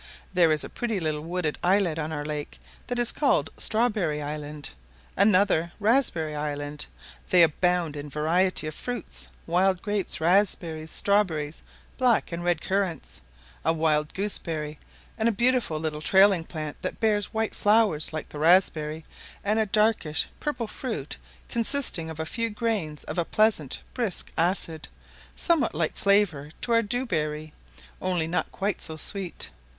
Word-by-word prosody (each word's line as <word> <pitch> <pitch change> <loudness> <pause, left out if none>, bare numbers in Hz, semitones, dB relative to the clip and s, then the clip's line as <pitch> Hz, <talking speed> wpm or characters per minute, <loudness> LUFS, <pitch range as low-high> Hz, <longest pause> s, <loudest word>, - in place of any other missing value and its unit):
There 175 -3 +4
is 155 -1 +1
a - - -5
pretty 230 -4 -3
little 155 -3 -2
wooded 165 -1 -2
islet 180 -3 +2
on 155 0 -3
our 145 -1 -4
lake, 150 -1 -5 0.3
that 245 - -2
is 240 -1 +5
called 285 -3 +1
Strawberry 215 -9 +2
island, 150 0 -5 0.4
another 195 -4 +3
Raspberry 210 - +2
island; 145 0 -4 0.4
they 180 -2 +6
abound 170 0 +1
in 145 0 -6
a - - -10
variety 160 +3 +1
of 155 - -4
fruits 245 +3 -4 0.2
wild 180 +2 +2
grapes, 205 -2 -1
raspberries, 165 -3 +1
strawberries, 165 -7 +1 0.4
black 245 -6 +2
and 170 +1 -4
red 175 -2 +1
currants, 190 -5 -2 0.4
a - - +2
wild 155 -2 0
gooseberry, 160 -7 0 0.4
and 220 +1 +3
a - - +2
beautiful 235 -7 +1
little 155 -1 -3
trailing 190 +1 +5
plant 155 -3 -6
that - - -4
bears 210 -3 +1
white 220 0 -1
flowers 205 -7 +2
like 155 0 -5
the 150 - -8
raspberry, 160 -2 +3 0.4
and 215 +2 +1
a 220 - +1
darkish 210 -7 +1
purple 275 -6 -2
fruit 215 - -5 0.3
consisting 230 - +2
of 160 -1 -8
a 160 - -2
few 230 +7 -1
grains 210 -9 -2
of - - -4
a - - +2
pleasant 210 -8 +1
brisk 230 -8 -3
acid, 165 -2 0 0.5
somewhat 315 - +1
like 155 0 0
in - - -19
flavour 200 -8 +2
to 240 - -4
our 230 0 +5
dewberry, 155 -10 -2 0.5
only 180 -3 0
not 165 0 -2
quite 200 -1 -2
so 160 - -3
sweet. 190 +1 -3
175 Hz, 155 wpm, -26 LUFS, 155-210 Hz, 0.5 s, they